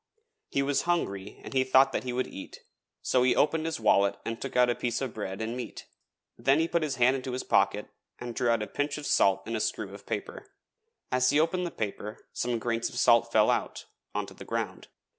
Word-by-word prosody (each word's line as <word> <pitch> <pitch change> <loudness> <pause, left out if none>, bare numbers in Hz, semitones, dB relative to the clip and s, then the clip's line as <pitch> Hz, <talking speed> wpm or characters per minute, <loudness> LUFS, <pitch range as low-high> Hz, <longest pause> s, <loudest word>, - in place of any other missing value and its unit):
He 140 - +1
was 140 0 +1
hungry 100 - -1
and - - -8
he 130 -1 +3
thought 130 +1 +5
he 125 - -3
would 125 +1 0
eat, 95 - -10 0.4
so 125 - +2
he 125 0 +4
opened 160 +1 +2
his 160 - -3
wallet 100 -2 +3
and 115 0 -4
took 135 - -5
out 125 0 +5
a 120 - +2
piece 120 -1 -2
of 130 -4 -3
bread 100 0 -4
and 115 +2 -3
meat, 125 - -7 0.5
then 135 +1 +4
he 165 +1 +2
put 170 0 0
his 150 -4 -1
hand 125 +2 +4
into 130 -1 -5
his 125 - -3
pocket - - +2 0.3
and 120 -1 -6
drew 120 0 0
out 115 -2 +2
a - - -5
pinch 145 +1 -2
of 150 - -7
salt 95 -6 +3
in 115 - -3
a - - -1
screw - - -2
of - - -12
paper. - - -5 0.6
As 125 0 +3
he 145 - +3
opened 175 +3 +1
the - - -6
paper 105 0 -5
some 120 -1 -1
grains 115 0 -1
of - - -9
salt 115 -2 +4
fell 110 -1 +5
out, - - -2 0.3
on - - -1
to - - -12
the - - -11
ground. - - -4
125 Hz, 230 wpm, -28 LUFS, 115-135 Hz, 0.6 s, thought